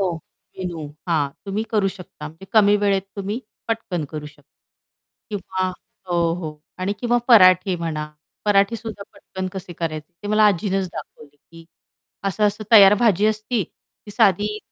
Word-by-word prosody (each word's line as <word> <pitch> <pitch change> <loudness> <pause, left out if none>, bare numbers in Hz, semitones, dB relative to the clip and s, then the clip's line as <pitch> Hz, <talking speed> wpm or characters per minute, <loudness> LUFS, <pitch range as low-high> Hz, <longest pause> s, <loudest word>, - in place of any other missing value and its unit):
हो 185 -3 +1 0.5
मेनू 175 -4 -4 0.2
हां, 155 -4 +2 0.2
तुम्ही 200 +3 -1
करू 210 -3 +2
शकता 180 -5 -9
म्हणजे 165 +5 -14
कमी 210 -2 +5
वेळेत 195 -1 +2
तुम्ही 205 +5 -3 0.3
पटकन 195 -8 -2
करू 150 -1 -6
शकता. 150 0 -15 0.9
किंवा 185 -2 -2 0.4
हो, 170 -1 +1
हो. 155 -4 -7 0.2
आणि 185 +2 -1
किंवा 240 0 +2
पराठे 185 -4 +6
म्हणा 155 -3 -4 0.3
पराठेसुद्धा 210 +1 +1
पटकन 190 -2 -7
कसे 185 -2 -7
करायचे 155 -1 -5
ते 205 - -5
मला 215 0 +4
आजीनच 195 0 +1
दाखवले, 145 -1 -10
की 165 +3 -17 0.6
असं-असं 210 +2 0
तयार 200 -2 +9
भाजी 210 -3 +4
असती, 215 +1 0
ती 205 - -19
साधी 205 +1 +2
195 Hz, 145 wpm, -22 LUFS, 170-210 Hz, 0.9 s, तयार